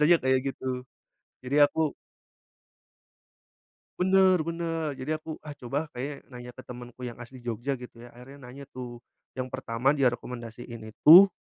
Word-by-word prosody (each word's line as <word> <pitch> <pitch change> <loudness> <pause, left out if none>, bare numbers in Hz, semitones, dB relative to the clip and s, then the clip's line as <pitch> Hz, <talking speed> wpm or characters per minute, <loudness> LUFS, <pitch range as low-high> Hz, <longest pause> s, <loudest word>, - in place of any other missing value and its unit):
biasanya 160 +3 +7
kayak 130 +1 +2
gitu. 130 -1 -3 0.6
Jadi 130 +3 0
aku 160 -1 0 2.1
Bener 185 -2 +5
bener. 165 -1 -2
Jadi 130 +4 -3
aku, 155 0 -7
ah, 150 -2 -8
coba 145 +4 -3
kayaknya 140 +3 -4
nanya 125 -1 -9
ke 130 - -11
temenku 125 0 -9
yang 120 - -7
asli 125 +2 -10
Jogja 120 +3 -3
gitu 120 -1 -11
ya, 120 - -12
akhirnya 135 +3 -13
nanya 140 +1 -10
tuh. 125 -3 -8 0.4
Yang 130 0 -3
pertama 130 +2 +1
dia 130 -3 +4
rekomendasiin 120 -1 -7
itu, 160 - +9
130 Hz, 145 wpm, -28 LUFS, 120-150 Hz, 2.1 s, itu